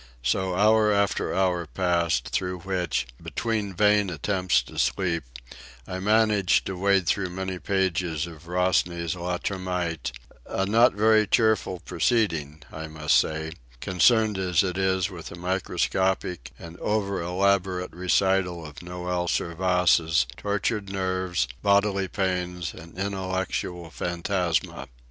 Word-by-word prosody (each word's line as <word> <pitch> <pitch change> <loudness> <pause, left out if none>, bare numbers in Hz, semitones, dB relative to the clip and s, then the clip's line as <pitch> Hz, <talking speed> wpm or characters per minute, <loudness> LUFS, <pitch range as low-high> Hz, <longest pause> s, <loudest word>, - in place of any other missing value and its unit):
So 90 +8 0
hour 105 +2 +4
after 100 -1 +1
hour 90 -3 0
passed, 85 -6 0
through 90 -1 -2
which, 90 -8 -1 0.2
between 105 -4 -2
vain 105 0 +3
attempts 90 +3 +1
to - - -8
sleep, 85 -5 0 0.6
I 90 +6 -5
managed 105 -1 +3
to 95 - -4
wade 95 0 +2
through 95 +2 0
many 95 0 -4
pages 90 -5 0
of 85 -1 -12
Rosny's 90 -2 0
Le 90 0 -2
Termite—a 90 -6 -4
not 115 +3 +4
very 110 0 +4
cheerful 110 -6 +2
proceeding, 80 - 0
I 80 0 -6
must 75 -1 +1
say, 80 0 +1 0.3
concerned 105 - +3
as 90 -3 +2
it 90 -2 -2
is 95 0 +1
with 85 -3 -8
the - - -8
microscopic 90 -2 -1
and 85 +1 -10
over 100 -3 -1
elaborate 90 +1 0
recital 90 -1 +1
of 75 -2 -11
Noël 90 +1 -3
Servaise's 85 -5 +2
tortured 100 0 -2
nerves, 95 -4 -1
bodily 100 -1 +2
pains, 90 -2 -2
and 85 +2 -13
intellectual 95 -3 -3
phantasma. 85 0 -2
90 Hz, 120 wpm, -26 LUFS, 85-100 Hz, 0.6 s, hour